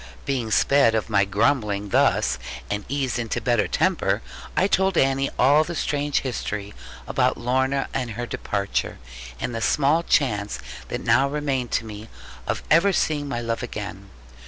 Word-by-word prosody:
Being 130 -5 -1
sped 125 +1 +4
of 110 0 -2
my 100 -1 +4
grumbling 105 -1 0
thus, - - +2 0.3
and 105 -1 -2
eased 135 -3 -1
into 115 -2 -2
better 120 -3 +1
temper, - - +1 0.3
I 190 - +4
told 190 -2 +2
Annie 135 0 +2
all 145 +4 +5
the 170 +2 -6
strange 145 -2 0
history 105 -5 -4 0.3
about - - +1
Lorna 130 +3 0
and 125 -2 -2
her 120 +3 -4
departure, 100 - -2 0.4
and 120 - -3
the 115 - -3
small 150 +7 +3
chance 105 - +1 0.3
that - - -4
now 135 +1 +3
remained 140 -4 -2
to 115 - 0
me 110 +1 -9 0.4
of - - -2
ever 170 +6 +5
seeing 150 -5 0
my 120 -4 -2
love 115 -1 -2
again. 100 -4 -6
125 Hz, 160 wpm, -24 LUFS, 105-140 Hz, 0.4 s, all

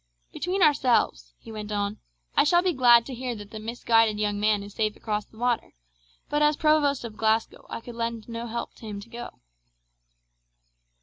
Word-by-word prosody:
'Between 365 +2 0
ourselves,' 230 - +2
he - - -12
went 215 -1 -6
on, 205 0 -2 0.4
'I - - +6
shall 345 +3 +4
be 365 -2 +2
glad 240 -3 +6
to 270 - -7
hear 250 0 -4
that 205 -1 -10
the 220 - -7
misguided 225 -1 +2
young 205 -1 0
man 210 -1 +2
is 200 0 -10
safe 215 -1 -1
across 210 -1 -3
the 220 - -21
water, 240 - -1 0.5
but 295 0 0
as 300 0 +4
Provost 300 -3 +3
of 220 -2 -8
Glasgow 220 0 0
I - - -5
could 240 - -9
lend 230 -1 -3
him 235 - -9
no 230 +1 -4
help 235 +1 -4
to 220 -2 -8
go.' 235 +4 -9
230 Hz, 185 wpm, -26 LUFS, 215-250 Hz, 0.5 s, I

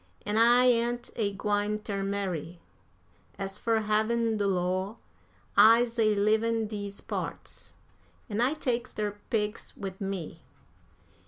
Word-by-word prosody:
An' 210 +1 -1
I 240 +3 +6
ain't 240 0 +1
a 210 -3 0
gwine 205 +1 0
ter 205 -2 -4
marry. 185 -4 -3 0.8
As 195 +1 -5
fur 225 -1 +1
havin' 220 +2 +1
de 205 -1 +1
law, 185 +2 -1 0.6
I's 230 +1 +6
a 215 -1 +4
leavin' 220 +2 +2
dese 205 -2 -6
parts, - - -6 0.5
an' 215 -1 -1
I 260 +5 +2
takes 245 -4 -2
der 205 -1 -3
pigs 210 -1 -2
wid 190 0 -6
me. 195 -4 -4
210 Hz, 130 wpm, -29 LUFS, 200-230 Hz, 0.8 s, I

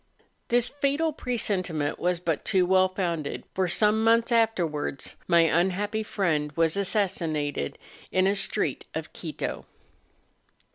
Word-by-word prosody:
This 240 0 +2
fatal 285 +3 0
presentiment 185 - -1
was 180 -1 0
but 170 -3 -2
too 185 -3 +3
well 185 +1 +4
founded, 170 -6 -3
for 185 -1 +1
some 210 +4 +3
months 230 +1 +3
afterwards 175 - 0
my 170 0 +5
unhappy 190 +6 +1
friend 165 -9 -1
was 165 +1 +2
assassinated 170 - -1 0.3
in 185 0 +3
a 195 - +3
street - - -1
of - - -5
Quito. - - -5
185 Hz, 125 wpm, -26 LUFS, 165-220 Hz, 0.3 s, my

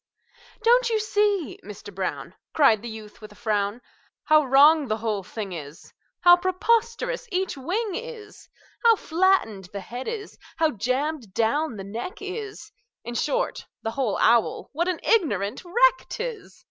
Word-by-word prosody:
"Don't 480 +1 +4
you 445 -1 +1
see, 415 - 0
Mister 205 0 -10
Brown," 190 -1 -4 0.2
Cried 250 -9 +5
the 235 - -6
youth, 220 -1 -10
with 215 -1 -11
a - - -15
frown, 210 0 -1 0.4
"How 310 0 +5
wrong 285 +3 +6
the 215 -1 -1
whole 215 -2 -2
thing 200 +1 -6
is, 150 -2 -10 0.3
How 350 0 +8
preposterous 465 +7 0
each 370 -2 -1
wing 375 - -2
is, 465 -2 -8 0.3
How 460 -1 +7
flattened 335 - +1
the 200 - -5
head 245 +5 -7
is, 440 -2 -6 0.2
how 320 -1 +2
jammed 255 - -2
down 235 +3 0
the 195 - -6
neck 225 - -6
is 415 +1 -7 0.3
In 240 - -6
short, - - -1 0.2
the 225 - -2
whole 250 -5 -1
owl, 235 0 +2
what 340 +4 0
an 365 -3 -1
ignorant 225 - +1
wreck - - +3
't 475 - -4
is! 475 -4 -7
305 Hz, 160 wpm, -25 LUFS, -, 0.4 s, How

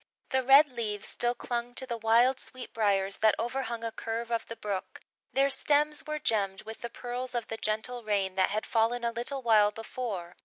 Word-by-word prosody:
The 265 - +2
red 275 +3 +7
leaves 215 -4 -3
still 240 0 0
clung 240 0 -4
to 260 - -1
the 240 -2 -3
wild 235 +4 +4
sweet 255 -1 -8
briars 200 -3 +1
that 220 -1 +4
overhung 235 -1 -3
a 230 - -2
curve 230 +1 -4
of 230 -1 -1
the 230 - -6
brook; 205 -4 -5 0.3
their 275 +1 +3
stems 300 +2 +1
were 305 0 -2
gemmed 200 -8 0
with 220 +1 -9
the 235 - -4
pearls 245 +1 -5
of 235 -2 -2
the 225 - -4
gentle 220 +3 -2
rain 200 -3 0
that 190 0 +2
had 215 +2 -2
fallen 235 +1 +1
a 235 - +1
little 250 +3 -3
while 215 -3 +5
before. 210 -5 -5
235 Hz, 200 wpm, -29 LUFS, 215-250 Hz, 0.3 s, red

